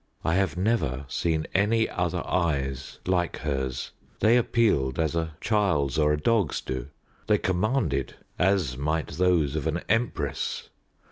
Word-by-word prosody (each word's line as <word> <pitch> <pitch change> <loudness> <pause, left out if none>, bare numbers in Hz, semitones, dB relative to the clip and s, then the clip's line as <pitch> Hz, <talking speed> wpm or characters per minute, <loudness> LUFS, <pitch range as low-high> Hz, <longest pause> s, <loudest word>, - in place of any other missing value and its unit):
I 80 - +2
have 95 -3 +1
never 90 - 0
seen 80 +1 -1
any 110 +3 +3
other 90 -2 -2
eyes 70 -6 -1
like 90 -2 0
hers. 65 -3 -3 0.3
They 110 +2 +5
appealed, 110 - +2
as 80 0 0
a 80 -2 -2
child's 80 -10 +1
or 75 -1 +4
a 75 - +2
dog's 105 - +1
do; 65 0 -5 0.4
they 105 -1 +4
commanded, 105 +8 0 0.2
as 90 -9 +2
might 75 +4 -1
those 85 -5 +2
of 80 0 -1
an 80 +2 -1
empress. 110 - -1
85 Hz, 140 wpm, -26 LUFS, 70-100 Hz, 0.4 s, They